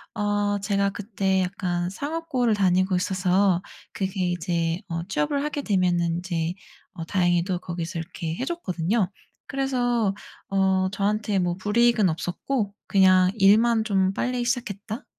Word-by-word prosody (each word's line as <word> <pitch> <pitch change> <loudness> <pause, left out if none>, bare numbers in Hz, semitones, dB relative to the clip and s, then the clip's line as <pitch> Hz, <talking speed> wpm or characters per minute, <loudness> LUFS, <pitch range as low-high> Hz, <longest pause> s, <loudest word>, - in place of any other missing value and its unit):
어 205 0 0
제가 200 0 +1
그때 195 -2 -1
약간 180 -2 -2
상업고를 285 -3 -1
다니고 185 -1 +2
있어서 185 0 +2 0.3
그게 190 -2 -1
이제 170 -1 -1
어 165 0 -3
취업을 195 - 0
하게 295 -1 -2
되면은 175 -6 +1
이제 170 -2 -2 0.4
어 165 - -6
다행히도 175 0 +1
거기서 170 -1 -5
이렇게 165 0 -5
해 260 - -3
줬거든요. 200 - -1 0.4
그래서 245 -6 0 0.3
어 190 -1 +2
저한테 205 0 0
뭐 175 -1 0
불이익은 215 0 +3
없었고 200 +6 -2
그냥 185 -2 +5
일만 220 +3 +4
좀 190 -3 +1
빨리 250 +2 -1
시작했다 230 -3 -3
195 Hz, 290 characters per minute, -25 LUFS, 180-220 Hz, 0.4 s, 그냥